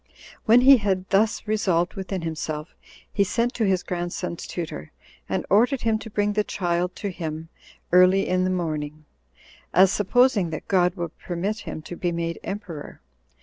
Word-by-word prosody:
When 235 +1 +6
he 270 +1 +8
had 190 -4 -1
thus 210 +4 +2
resolved 185 -5 +1
within 190 -2 -4
himself, 155 -1 -4 0.4
he 200 - +3
sent 235 +5 0
to 225 - 0
his 185 -2 +1
grandson's 175 -1 -4
tutor, 160 - -6 0.4
and - - -1
ordered 245 +6 +3
him 225 -1 +1
to 225 - -9
bring 205 0 0
the 210 0 +1
child 175 -2 -1
to 200 - -4
him 160 -2 -6 0.4
early 185 +2 +5
in 185 0 +1
the 185 - +1
morning, 155 -4 -3 0.7
as 190 +2 +6
supposing 210 -2 +3
that 155 - -6
God 180 -2 +2
would 170 -4 -5
permit 190 +5 -3
him 155 - -6
to 175 - -7
be 175 0 -1
made 170 0 -3
emperor. 180 -7 -7
185 Hz, 165 wpm, -24 LUFS, 170-210 Hz, 0.7 s, he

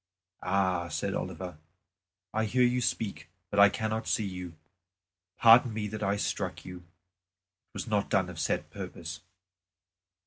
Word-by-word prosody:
"Ah!" 95 -2 +1
said - - -2
Oliver, 90 -4 -5 0.7
"I 110 +1 +1
hear 125 +4 +2
you 125 +1 +3
speak, 105 -7 -2 0.2
but 100 - +1
I 100 0 +9
cannot 110 +1 -2
see 110 - +1
you. 90 -3 -6 0.8
Pardon 115 0 +7
me 105 -1 -2
that 110 +1 -6
I 100 -1 +1
struck 100 - -3
you; 90 -1 -7
it 90 +1 -26
was - - -3
not - - 0
done - - +2
of - - -8
set - - -1
purpose." 80 -1 -7
100 Hz, 145 wpm, -29 LUFS, 90-110 Hz, 0.8 s, I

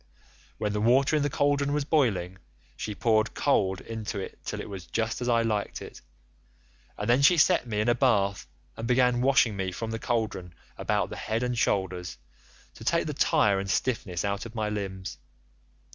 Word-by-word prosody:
When 105 -1 -2
the 105 - -1
water 130 +6 +4
in 150 - +2
the 145 - +1
cauldron 145 0 +1
was 150 -1 0
boiling,87 105 - +1 0.4
she 105 - -5
poured 110 0 +1
cold 95 -9 +1
into 110 -2 -5
it 95 - -6
till - - -4
it - - -6
was 95 -4 -8
just 115 +1 -2
as 125 - -1
I 115 -1 +3
liked 105 -3 -2
it, - - -10 1.0
and 105 - -3
then 120 +3 +4
she 170 +5 +6
set 165 -4 +4
me 105 -2 -2
in 110 - -1
a 120 - +5
bath 100 - +1 0.3
and 115 - -5
began 125 0 +3
washing 130 -5 +3
me 95 -1 -2
from 110 +5 -5
the 115 - -3
cauldron 110 -9 -2 0.2
about - - -1
the - - -6
head 115 +2 -2
and 125 0 -1
shoulders, 90 -6 -1 0.6
to - - -12
take - - +1
the - - -3
tire 100 -2 +3
and 100 0 -4
stiffness 100 -7 -1
out 100 +3 -2
of 115 - -14
my 110 -1 -1
limbs. 95 -3 -5
110 Hz, 190 wpm, -27 LUFS, 100-125 Hz, 1.0 s, she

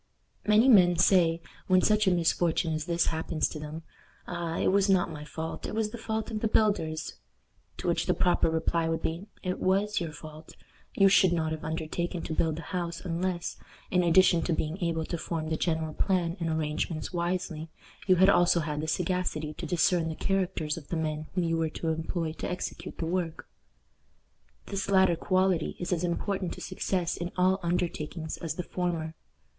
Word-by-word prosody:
Many 215 +4 +5
men 180 -8 +6
say, 170 -2 +4 0.2
when 185 -1 +4
such 215 -1 +3
a - - +5
misfortune 165 -1 +1
as 155 0 -2
this 170 0 +1
happens 160 0 -1
to 155 - -7
them, 155 +2 -7 0.4
"Ah! 170 -2 -3
it - - +2
was 200 +1 +3
not 185 -3 +3
my 150 -1 -7
fault. 160 +1 -5
It - - -5
was 220 -1 0
the 235 - -6
fault 220 0 -3
of 215 - -2
the 220 - +1
builders;" 200 -8 0 0.6
to - - -5
which - - +1
the - - +2
proper 175 -2 +3
reply 165 0 0
would 165 0 -2
be, 170 +5 -3 0.2
"It 185 -1 -2
was 200 +3 +1
your 165 -2 -3
fault. 155 0 -11 0.4
You 195 - +6
should 190 -2 +5
not 160 -2 0
have 160 -1 -4
undertaken 165 +2 -3
to - - -4
build 160 -1 0
a - - -5
house 170 -2 -3
unless, 175 0 -2 0.3
in 180 - +4
addition 175 0 +5
to 175 - +1
being 160 +4 -2
able 165 -1 0
to 170 - -4
form 160 -1 -3
the 160 - 0
general 160 -1 -1
plan 175 -2 0
and 165 -1 -1
arrangements 160 +1 -2
wisely, 175 -2 -2 0.4
you 185 - +6
had 190 +2 +5
also 175 -3 +4
had 150 -1 -3
the 155 - -3
sagacity 165 -2 -1
to 165 +2 -6
discern 170 0 +2
the 160 - -4
characters 180 -6 -1
of 150 - -9
the 170 - -2
men 155 -1 -2
whom 180 - +1
you 165 0 0
were 165 -1 0
to 165 - -3
employ 160 +1 -2
to - - -3
execute 180 - -5
the 165 - -2
work." 170 -1 -2 1.2
This 200 0 -3
latter 190 -3 +5
quality 185 -1 +1
is 175 +1 -1
as 175 0 -1
important 185 +1 -1
to - - -10
success 185 -2 -2
in 175 +1 -4
all 185 +1 +3
undertakings 170 -2 -2
as 160 -2 -4
the 180 - -3
former. 170 -3 -2
170 Hz, 195 wpm, -29 LUFS, 160-185 Hz, 1.2 s, men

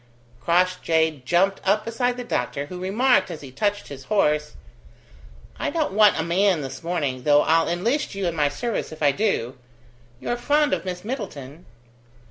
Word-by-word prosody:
Crossjay 170 -4 +1
jumped 190 +6 +2
up 215 0 +1
beside 245 +2 -1
the 250 - -4
doctor, 140 - -2
who 180 +4 -8
remarked, 210 +2 +2
as 165 -3 -7
he 135 -3 -10
touched 205 +9 -1
his 135 -2 -9
horse: 150 -7 +1 1.0
"I - - -1
don't 310 - -1
want 210 -3 +5
a - - +1
man 180 0 +2
this 135 -1 -7
morning, 150 -7 -2
though 145 +2 +4
I'll 165 +1 +2
enlist 220 - -1
you 195 -1 -2
in 170 -1 -1
my 150 -2 +2
service 220 +10 -3
if 155 0 -7
I 145 - +5
do. 135 - -1 0.6
You're 240 - -2
fond 290 +4 +2
of - - -2
Miss 180 0 -5
Middleton?" 175 - -7
180 Hz, 170 wpm, -23 LUFS, 150-210 Hz, 1.0 s, want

